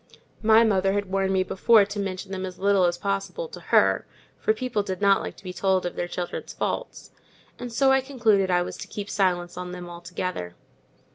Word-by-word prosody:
My 220 +1 +6
mother 195 -3 +2
had 200 -2 -2
warned 195 0 +1
me 190 -1 +2
before 205 +3 +4
to 205 +1 -6
mention 195 0 -4
them 190 -1 -4
as 185 -1 -6
little 200 -1 +3
as 175 0 +1
possible 200 - -3
to - - -9
her, - - +4 0.3
for - - +2
people 220 -1 -1
did 190 -2 -4
not 200 -1 +4
like - - -6
to - - -16
be 180 -1 -6
told 190 0 +1
of 175 - -3
their 175 - -2
children's 175 0 -5
faults, - - -4 0.5
and 245 -1 -6
so 265 +3 +3
I 265 0 +4
concluded 225 -8 +2
I 175 -1 +3
was - - -7
to - - -8
keep 205 -1 -6
silence 180 -2 0
on 180 0 -5
them 180 -1 -7
altogether. 170 - -5
195 Hz, 210 wpm, -25 LUFS, 180-210 Hz, 0.5 s, My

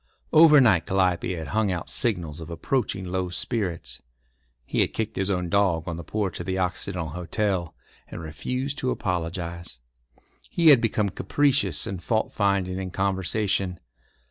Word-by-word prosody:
Over 155 -2 +8
night 110 -10 +4
Calliope 90 -2 +1
had 80 -3 -6
hung 110 -2 +1
out 90 -2 -3
signals 85 -9 -1
of 80 0 -8
approaching 95 +3 -1
low 90 0 -2
spirits. 90 - -3 0.6
He - - -2
had - - 0
kicked 110 -2 -2
his 95 +1 0
own 90 -2 0
dog 95 -4 +1
on 85 - -3
the 85 - -6
porch 100 -2 -2
of 85 - -6
the 95 0 -1
Occidental 90 -2 -2
Hotel, 90 +1 -2 0.3
and - - -8
refused 125 - -4
to 130 - -1
apologise. 85 - -3 0.7
He 165 -2 +4
had 135 -6 +8
become 105 -3 +1
capricious 115 - +1
and 95 -3 -5
fault 110 +2 0
finding 100 -2 +1
in 95 -1 -4
conversation. 95 0 0
95 Hz, 155 wpm, -25 LUFS, 85-105 Hz, 0.7 s, Over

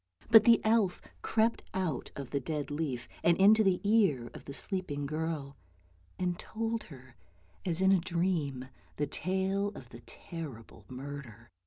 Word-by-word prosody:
But 225 -1 +9
the 235 -2 +7
elf 215 -4 +2 0.2
crept 225 +1 +1
out 170 -9 -2
of 140 -3 -7
the 140 - 0
dead 150 +2 -4
leaf, 145 -6 -3 0.2
and 170 0 +4
into 215 +3 +6
the 190 -3 +3
ear 195 - +2
of - - -11
the - - -7
sleeping 150 -4 -2
girl, 155 -2 -3 0.6
and 180 -1 -1
told 225 0 -3
her, 130 -4 -14 0.5
as 175 +1 +1
in 190 - +6
a 195 - +5
dream, 165 -7 -1 0.3
the 145 - 0
tale 190 +6 -1
of 120 - -11
the 120 -1 -11
terrible 145 -10 -9
murder. 130 -4 -8
165 Hz, 155 wpm, -31 LUFS, 140-190 Hz, 0.6 s, But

